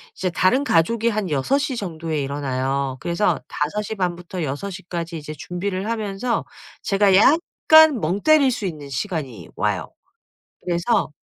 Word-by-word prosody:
이제 185 - -1
다른 185 +10 +2
가족이 230 - +2
한 215 -4 -2
6:00 265 - 0
정도에 165 -7 -3
일어나요. 135 -1 -2
그래서 175 +4 0
5:30 185 +3 -2
부터 175 0 -6
6:00 165 +7 -4
까지 170 -1 -4
이제 155 0 -7
준비를 185 +6 -4
하면서 220 +1 -2 0.4
제가 195 -1 +3
약간 315 - +5
멍 185 +5 -1
때릴 310 -4 +5
수 215 -4 -3
있는 150 -5 -5
시간이 135 - -4
와요. - - -1 0.7
그래서 180 +1 0
180 Hz, 255 characters per minute, -22 LUFS, 155-215 Hz, 0.7 s, 약간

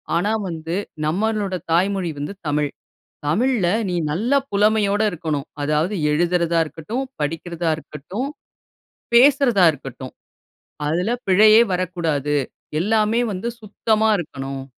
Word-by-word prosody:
ஆனா, 200 +6 +1 0.2
வந்து 165 0 -4 0.3
நம்மளோட 200 +3 0 0.2
தாய்மொழி 185 +1 +1
வந்து 145 +7 -4
தமிழ். 150 0 +1 0.6
தமிழ்ல 220 - +2 0.2
நீ 180 - -2 0.2
நல்ல 220 - -1 0.2
புலமையோட 205 0 +2
இருக்கணும். 155 -4 -3 0.2
அதாவது 155 +7 0 0.2
எழுதுறதா 170 +1 +1
இருக்கட்டும், 210 - -4 0.2
படிக்கிறதா 165 +2 -2
இருக்கட்டும், 160 - -6 0.9
பேசுறதா 245 -6 +6
இருக்கட்டும். 135 -2 -9 0.8
அதில 180 +9 0
பிழையே 215 +4 +7
வரக்கூடாது. 165 -5 -1 0.5
எல்லாமே 220 +3 +2
வந்து 185 +5 -4
சுத்தமா 220 +1 +1
இருக்கணும். 135 -5 -5
180 Hz, 100 wpm, -21 LUFS, 155-215 Hz, 0.9 s, பிழையே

